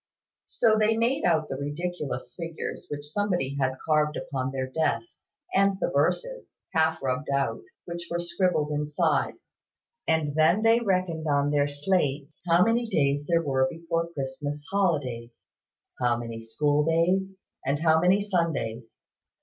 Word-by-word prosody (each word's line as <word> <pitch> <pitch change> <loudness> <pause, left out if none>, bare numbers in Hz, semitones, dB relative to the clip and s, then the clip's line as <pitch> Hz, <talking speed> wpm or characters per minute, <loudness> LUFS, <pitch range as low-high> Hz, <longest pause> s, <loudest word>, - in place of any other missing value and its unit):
So 220 -2 +3
they 220 +1 +3
made 245 +5 +1
out 160 -3 +2
the 135 - -4
ridiculous 145 -1 -4
figures 165 -2 -6
which 145 0 -5
somebody 180 -9 -1
had 130 -1 0
carved 150 -1 +2
upon 130 -2 -3
their 135 -1 -2
desks, 160 - -3 0.2
and 195 0 +3
the - - 0
verses, - - -1 0.2
half 160 -1 +2
rubbed 135 +3 -1
out, 140 - 0 0.2
which 170 0 -6
were 170 - -1
scribbled 175 -3 0
inside: 150 0 0 0.7
and 160 -3 +1
then 160 +7 +3
they 225 +1 +5
reckoned, 185 -7 0
on 145 0 +2
their 145 -1 +2
slates, 145 -1 -1
how 170 +1 +5
many 230 +2 +1
days 145 -6 +1
there 170 -1 +2
were 130 -3 +2
before 165 +1 -2
the 170 - -18
Christmas 145 +2 -4
holidays; 140 -12 -1 0.6
how 120 -1 +2
many 115 -1 -6
school 145 +6 +1
days, 180 +4 +1 0.3
and 140 +2 0
how 160 -1 +4
many 180 +4 +4
Sundays. 160 - -2
160 Hz, 150 wpm, -27 LUFS, 140-180 Hz, 0.7 s, they